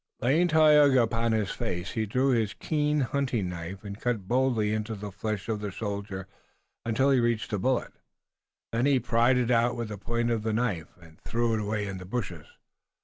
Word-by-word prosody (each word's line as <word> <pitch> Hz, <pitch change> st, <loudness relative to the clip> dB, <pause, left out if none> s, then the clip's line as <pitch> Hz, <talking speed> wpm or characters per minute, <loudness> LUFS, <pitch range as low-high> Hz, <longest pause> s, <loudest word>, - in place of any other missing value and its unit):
Laying 150 Hz, +9 st, +3 dB
Tayoga 150 Hz, -5 st, +6 dB
upon 115 Hz, 0 st, 0 dB
his 110 Hz, -3 st, 0 dB
face, 95 Hz, -6 st, -3 dB
he 110 Hz, -1 st, -2 dB
drew 130 Hz, +6 st, +1 dB
his 115 Hz, -5 st, +1 dB
keen 150 Hz, -1 st, 0 dB
hunting 130 Hz, -7 st, -1 dB
knife 90 Hz, +3 st, -7 dB
and 100 Hz, 0 st, -8 dB
cut 115 Hz, -6 st, -1 dB
boldly 120 Hz, -4 st, +1 dB
into 110 Hz, +1 st, -2 dB
the 105 Hz, 0 st, -7 dB
flesh 100 Hz, +1 st, -4 dB
of 110 Hz, -2 st, -1 dB
the 105 Hz, 0 st, -4 dB
shoulder 100 Hz, -2 st, -5 dB, 0.6 s
until 130 Hz, +5 st, +2 dB
he 135 Hz, -, +4 dB
reached 120 Hz, -2 st, 0 dB
the 105 Hz, -, 0 dB
bullet. 130 Hz, +5 st, 0 dB, 0.8 s
Then 120 Hz, +4 st, +1 dB
he 140 Hz, -2 st, +4 dB
pried 120 Hz, +2 st, +3 dB
it 125 Hz, -1 st, +1 dB
out 120 Hz, 0 st, +3 dB
with 115 Hz, -2 st, -4 dB
the 105 Hz, -2 st, -6 dB
point 120 Hz, +3 st, -1 dB
of 115 Hz, -2 st, 0 dB
the 110 Hz, 0 st, -1 dB
knife, 105 Hz, -10 st, -2 dB
and 80 Hz, -2 st, -18 dB
threw 115 Hz, 0 st, 0 dB
it 110 Hz, -, +1 dB
away 105 Hz, 0 st, -2 dB
in 100 Hz, -2 st, -5 dB
the 90 Hz, -, -9 dB
bushes. 90 Hz, -7 st, -4 dB
115 Hz, 200 wpm, -28 LUFS, 100-125 Hz, 0.8 s, Tayoga